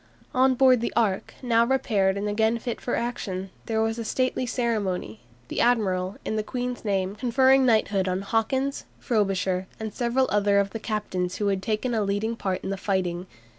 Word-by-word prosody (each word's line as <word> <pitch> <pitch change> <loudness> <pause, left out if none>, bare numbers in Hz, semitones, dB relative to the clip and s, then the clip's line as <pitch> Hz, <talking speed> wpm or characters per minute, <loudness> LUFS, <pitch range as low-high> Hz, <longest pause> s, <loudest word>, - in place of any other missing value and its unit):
On 260 0 +4
board 255 -2 +5
the 235 - -1
"Ark," 205 -5 0
now 230 -2 +4
repaired 215 -6 +1
and 205 +1 -2
again 220 +2 +1
fit 235 0 -5
for 245 - -1
action, 195 -6 -3 0.2
there 220 -1 +1
was 225 +1 -1
a - - -2
stately 255 +2 -1
ceremony, 205 - -2 0.3
the - - -2
admiral, 195 -5 +1
in 220 - -1
the - - +1
Queen's 250 +2 -4
name, 195 -2 0
conferring 260 +3 +4
knighthood 205 -4 +2
on 185 +1 -1
Hawkins, 260 +6 -1
Frobisher 195 -5 0
and 220 -1 -5
several 250 +1 +1
other 205 -1 +3
of 200 -1 +2
the 225 - -5
captains 195 -5 -2
who 205 -1 0
had 195 -1 0
taken 215 +5 -1
a 220 - +1
leading 205 +3 -1
part 190 -4 -3
in 190 - -3
the 195 - -2
fighting. 185 -2 -1
215 Hz, 185 wpm, -25 LUFS, 195-240 Hz, 0.3 s, board